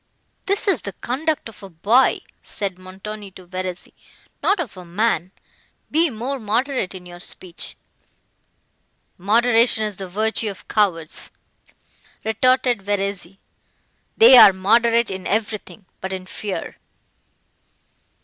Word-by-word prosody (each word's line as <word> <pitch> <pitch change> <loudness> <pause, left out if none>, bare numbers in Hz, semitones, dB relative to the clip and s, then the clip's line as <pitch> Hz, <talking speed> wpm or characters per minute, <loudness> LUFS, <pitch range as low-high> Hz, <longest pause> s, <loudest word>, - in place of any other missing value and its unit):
"This 400 +2 +1
is 370 -10 +2
the 200 - -6
conduct 290 - -2
of 225 - -12
a 195 - -10
boy," 210 +10 +3 0.2
said 195 -3 -5
Montoni 195 +3 -8
to 185 - -13
Verezzi, 185 0 -6 0.5
"not 400 -1 +2
of 275 - -4
a 185 - -10
man: 185 +1 -1 0.6
be 325 +2 +4
more 255 +3 -4
moderate 230 -1 -1
in 180 -1 -10
your 175 0 -11
speech." 180 0 -3 1.4
"Moderation 225 +3 +3
is 210 -3 -3
the 190 -2 -7
virtue 220 +3 0
of 195 - -10
cowards," 170 -7 0 1.0
retorted 250 +1 +2
Verezzi; 195 -2 -3 0.8
"they 450 - +9
are 195 - +10
moderate 230 +4 +3
in 190 -1 -5
everything—but 210 -2 -4
in 185 -1 -5
fear." 195 +1 -6
210 Hz, 120 wpm, -21 LUFS, 185-235 Hz, 1.4 s, are